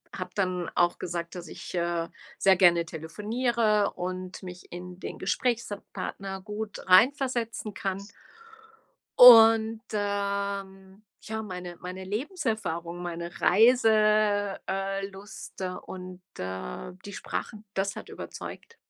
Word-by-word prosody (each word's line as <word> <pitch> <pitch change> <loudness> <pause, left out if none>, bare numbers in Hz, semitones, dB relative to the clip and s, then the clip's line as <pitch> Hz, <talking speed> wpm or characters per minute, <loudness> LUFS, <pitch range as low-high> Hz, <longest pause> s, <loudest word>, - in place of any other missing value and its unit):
habe - - -5
dann 185 -3 -1
auch 175 0 +3
gesagt, 170 0 -4
dass 175 -2 -7
ich, - - -8
äh, 170 -1 -1 0.3
sehr 190 -1 +6
gerne 175 -2 +5
telefoniere 210 +6 0
und 185 +1 -5
mich 180 -1 -10
in 180 +1 -8
den - - -6
Gesprächspartner 200 -3 -3
gut 210 +1 -6
reinversetzen 230 0 +3
kann. 195 0 -3 1.2
Und, 225 -2 +9
ähm, 200 -1 -3 0.2
ja, 220 0 -4
meine 180 -3 -7
meine 185 +1 -7
Lebenserfahrung, 210 - -3
meine 170 0 -6
Reise 225 +4 +5 0.7
äh 195 +1 -2
-lust 195 0 -9 0.2
und, 185 0 -8 0.2
äh, 95 - -5
die 200 - -8
Sprachen, 215 +1 -5
das 195 +1 -1
hat - - -8
überzeugt. 460 - -8
195 Hz, 110 wpm, -28 LUFS, 180-215 Hz, 1.2 s, Und